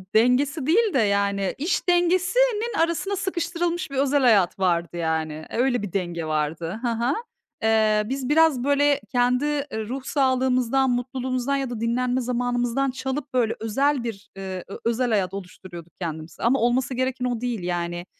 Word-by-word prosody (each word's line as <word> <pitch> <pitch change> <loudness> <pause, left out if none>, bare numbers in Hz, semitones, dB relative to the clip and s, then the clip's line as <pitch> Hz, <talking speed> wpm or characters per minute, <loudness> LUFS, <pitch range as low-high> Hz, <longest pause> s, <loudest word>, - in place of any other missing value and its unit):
dengesi 260 +5 +3
değil 420 +6 +3
de, 265 - +3
yani, 200 -2 +1
iş 320 +5 -1
dengesinin 415 +6 +2
arasına 335 +4 0
sıkıştırılmış 345 -3 -2
bir 275 - -5
özel 280 +1 +2
hayat 200 -7 +4
vardı, 175 -2 0
yani. 160 -2 -2
Öyle 245 -1 +1
bir 200 -4 -6
denge 175 -4 -2
vardı. 155 +5 -2
Hı 245 - +1
hı. 235 +4 0 0.5
Eee, 220 -1 +3
biz 265 +3 -3
biraz, 305 -5 +4
böyle, 285 +1 +3
kendi 250 +1 +2 0.4
ruh 260 +1 -4
sağlığımızdan, 260 -1 +2
mutluluğumuzdan 255 +2 -1
ya 270 -2 -2
da 240 -3 -5
dinlenme 250 +2 0
zamanımızdan 245 +2 0
çalıp, 265 +2 -4
böyle, 235 -3 +1
özel 270 +5 +1
bir, 210 -4 -6
eee, 190 -2 -5
ö 195 - -7
özel 240 +1 +1
hayat 195 -3 +1
oluşturuyorduk 180 -3 -9
kendimize. 160 -2 -6
Ama 255 +4 +3
olması 250 +2 +1
gereken 255 0 -1
o 240 -2 -2
değil, 240 -6 -2
yani, 175 0 -3
245 Hz, 155 wpm, -24 LUFS, 200-275 Hz, 0.5 s, hayat